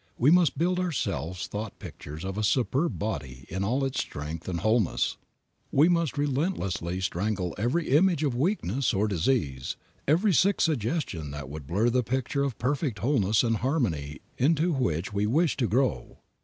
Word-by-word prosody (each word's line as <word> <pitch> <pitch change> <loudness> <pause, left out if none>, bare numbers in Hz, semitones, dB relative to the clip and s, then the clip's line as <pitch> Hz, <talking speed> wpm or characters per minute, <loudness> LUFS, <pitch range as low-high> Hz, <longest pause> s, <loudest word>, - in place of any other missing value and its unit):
We 135 +6 +4
must 175 -5 +4
build 180 +4 +1
ourselves 95 - -2
thought 105 0 -6
pictures 75 +5 -8
of 95 0 -3
a 110 - -2
superb 135 +8 +1
body 65 -12 -4
in 95 +3 -2
all 130 +7 +1
its 135 -1 -2
strength 75 +3 -5
and 85 -2 -2
wholeness; 110 -1 +1 0.5
we 150 +5 +5
must 170 -6 +1
relentlessly 130 - -1
strangle 95 0 -1
every 125 +10 0
image 160 +3 +4
of 140 -4 +1
weakness 135 - 0
or 105 +3 +2
disease, 80 - -1 0.3
every 180 +8 +3
sick 190 +7 +3
suggestion 120 - -1
that 70 -2 -7
would 75 -1 -8
blur 105 +9 +2
the 125 +1 +2
picture 130 +4 -1
of 135 -5 -2
perfect 130 -2 -1
wholeness 110 -2 +2
and 115 -2 +1
harmony 90 - -1 0.2
into 160 +5 +3
which 90 - -1
we 100 +1 +1
wish 155 +6 +2
to 125 -4 +1
grow. 125 +6 0
120 Hz, 165 wpm, -27 LUFS, 95-145 Hz, 0.5 s, we